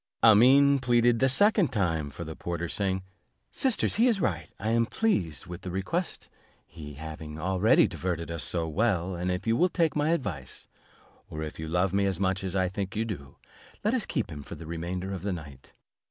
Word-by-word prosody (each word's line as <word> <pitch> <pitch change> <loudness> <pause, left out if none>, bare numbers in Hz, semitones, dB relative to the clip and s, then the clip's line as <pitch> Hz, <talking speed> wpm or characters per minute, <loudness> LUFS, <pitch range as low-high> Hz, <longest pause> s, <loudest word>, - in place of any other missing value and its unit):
Amene 135 +6 +7
pleaded 120 -2 +3
the 130 - +4
second 200 - +4
time 80 -7 0
for 75 +5 -7
the 80 -1 -7
porter, 85 0 -4
saying, 95 0 -1 0.5
"Sisters, 260 -6 +1
he 245 - +6
is 225 -5 +2
right, 85 - -1
I 110 - -1
am 115 0 +2
pleased 90 - -1
with 90 +1 -8
the 95 - -6
request, 100 - -3 0.4
he 75 -4 -10
having 75 0 -8
already 95 +5 +4
diverted 85 -2 -3
us 85 -1 0
so 85 -2 0
well; 95 0 0
and, 90 +1 -2
if 90 +1 -2
you 115 0 +2
will 180 +8 +3
take 165 -2 +1
my 150 +1 +1
advice, 80 - -3 0.6
or 80 0 -5
if 75 - -7
you 80 - -4
love 90 +3 +1
me 100 0 +2
as 95 -2 -1
much 95 0 0
as 95 0 -3
I 95 -1 +2
think 95 +1 -4
you 110 +2 0
do, 75 -11 -7 0.5
let 215 +3 +1
us 250 -6 -1
keep 120 - -2
him 75 -2 -7
for - - -9
the 80 - -10
remainder 90 +4 -4
of 95 - -5
the 100 0 -2
night." 70 -6 -10
95 Hz, 205 wpm, -28 LUFS, 85-120 Hz, 0.6 s, Amene